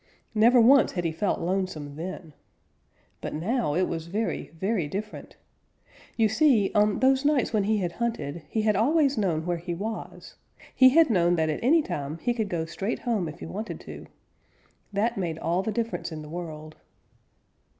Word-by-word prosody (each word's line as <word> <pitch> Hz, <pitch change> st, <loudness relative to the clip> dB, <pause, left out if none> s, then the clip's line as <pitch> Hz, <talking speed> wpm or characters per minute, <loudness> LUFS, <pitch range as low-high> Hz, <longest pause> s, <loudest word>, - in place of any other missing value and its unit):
Never 235 Hz, +3 st, +5 dB
once 255 Hz, +3 st, +6 dB
had 175 Hz, -, -2 dB
he 165 Hz, -, +1 dB
felt 190 Hz, +5 st, -1 dB
lonesome 170 Hz, -5 st, -3 dB
then. 165 Hz, -1 st, -7 dB, 0.9 s
But -, -, -5 dB
now 185 Hz, -, -1 dB
it 185 Hz, +1 st, +2 dB
was 165 Hz, -1 st, -4 dB
very, 215 Hz, +6 st, -3 dB
very 190 Hz, -4 st, 0 dB
different. 210 Hz, +7 st, -6 dB, 0.8 s
You 225 Hz, -2 st, +4 dB
see, 220 Hz, -2 st, +3 dB
on 210 Hz, -1 st, +2 dB
those 265 Hz, +1 st, +4 dB
nights 285 Hz, -5 st, +1 dB
when 210 Hz, -2 st, +2 dB
he 215 Hz, +1 st, +2 dB
had 180 Hz, -4 st, -1 dB
hunted 170 Hz, -8 st, -3 dB
he 220 Hz, -1 st, -1 dB
always 275 Hz, -, +3 dB
had 220 Hz, -, -1 dB
known 165 Hz, -5 st, 0 dB
where 175 Hz, -1 st, -1 dB
he 175 Hz, 0 st, -4 dB
was. 215 Hz, +5 st, -6 dB, 0.4 s
He 260 Hz, 0 st, +7 dB
had 315 Hz, 0 st, +5 dB
known 175 Hz, -3 st, +3 dB
that 160 Hz, -2 st, +1 dB
at 155 Hz, -, -3 dB
any 310 Hz, +6 st, +4 dB
time 145 Hz, -, -4 dB
he 240 Hz, +7 st, -1 dB
could 220 Hz, -4 st, -2 dB
go 165 Hz, -3 st, -2 dB
straight 195 Hz, +6 st, -3 dB
home 220 Hz, -8 st, -1 dB
if 150 Hz, -, -11 dB
he -, -, -5 dB
wanted 215 Hz, +3 st, -6 dB
to. -, -, -10 dB, 0.8 s
That 215 Hz, +3 st, 0 dB
made 165 Hz, -4 st, -2 dB
all 170 Hz, +3 st, 0 dB
the 220 Hz, -, -2 dB
difference 230 Hz, -4 st, -3 dB
in 155 Hz, -1 st, -6 dB
the 150 Hz, -, -10 dB
world. 155 Hz, -2 st, -7 dB
195 Hz, 180 wpm, -26 LUFS, 165-230 Hz, 0.9 s, He